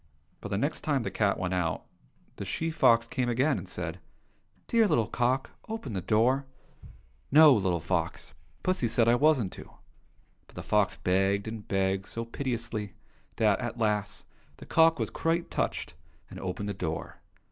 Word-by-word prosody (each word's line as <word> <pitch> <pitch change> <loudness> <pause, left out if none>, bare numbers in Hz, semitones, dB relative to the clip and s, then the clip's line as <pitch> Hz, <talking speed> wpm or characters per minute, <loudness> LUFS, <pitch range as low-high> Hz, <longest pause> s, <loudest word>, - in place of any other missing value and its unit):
But 100 - -6
the 100 - -1
next 145 +8 -1
time 140 -5 0
the - - -3
cat 100 -2 +1
went 90 0 -2
out, 90 -3 -1 0.5
the - - -5
she 165 0 -2
fox 115 -6 +4
came 125 0 -1
again, 130 +5 +2
and - - -9
said, 85 -1 -5 0.3
" - - -39
Dear 230 -2 +4
little 115 - +2
cock, 125 +4 0 0.2
open 220 - -5
the 95 - -2
door! 120 +8 +2 0.3
" - - -18
— - - -27
" 70 +1 -37
No, 150 0 +8
little 95 -6 +1
fox! 65 -4 -3 0.3
Pussy 185 -10 +1
said 115 0 +2
I 120 - +5
wasn't 130 -6 +3
to." - - -11 0.8
But - - -21
the - - -6
fox 105 -2 +2
begged 95 +2 +1
and 110 -1 -7
begged 95 0 0
so 115 0 -5
piteously 115 -5 -4 0.4
that, 110 -3 +2
at 120 -1 -4
last, 105 -3 -1 0.3
the - - -11
cock 165 0 +4
was - - -2
quite 165 +1 -1
touched, - - -2 0.4
and 95 - -8
opened 95 +2 -4
the - - -2
door. 80 -4 -5
110 Hz, 180 wpm, -29 LUFS, 95-135 Hz, 0.8 s, No